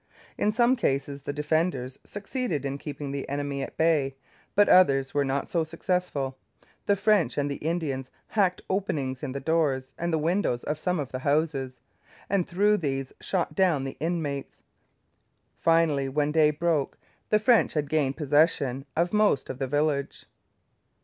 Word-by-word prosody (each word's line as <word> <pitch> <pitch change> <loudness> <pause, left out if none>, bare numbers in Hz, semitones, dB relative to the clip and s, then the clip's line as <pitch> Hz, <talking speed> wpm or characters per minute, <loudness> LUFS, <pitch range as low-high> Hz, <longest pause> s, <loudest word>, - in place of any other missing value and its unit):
In 210 - +1
some 240 +3 +3
cases 140 - -1
the 140 - -4
defenders 150 -3 -1
succeeded 205 - -3
in 140 +1 -3
keeping 145 -1 -6
the 140 0 -4
enemy 140 0 -2
at - - -6
bay; 150 -5 +2 0.4
but 205 0 +5
others 135 -7 +5
were 145 - +2
not 135 0 -1
so 170 -2 0
successful. 160 -5 -2 0.5
The 200 - +4
French 205 -2 +2
and 145 0 0
the 140 - -3
Indians, 150 -5 -2 0.2
hacked 190 -4 +1
openings 145 -10 -2
in 145 - -4
the 140 - -3
doors 135 -3 0
and 170 +1 -1
the 160 - +2
windows 160 -5 0
of 150 0 -3
some 180 +1 0
of 140 -3 -4
the 130 - -4
houses, 140 -2 0 0.5
and 195 -3 +1
through 205 +4 +3
these 135 -6 -3
shot 185 -3 -1
down 175 -8 +2
the 135 - -6
inmates. 155 -4 -3 1.0
Finally, 160 -5 +2
when 145 +2 0
day 155 -1 +5
broke, 150 -1 0 0.3
the 215 - +5
French 225 +2 +3
had 150 -2 -1
gained 140 -3 0
possession 145 -3 +2
of 175 +3 +1
most 210 -10 +2
of 130 - -9
the 135 - -1
village. 145 0 -1
150 Hz, 165 wpm, -27 LUFS, 135-175 Hz, 1.0 s, but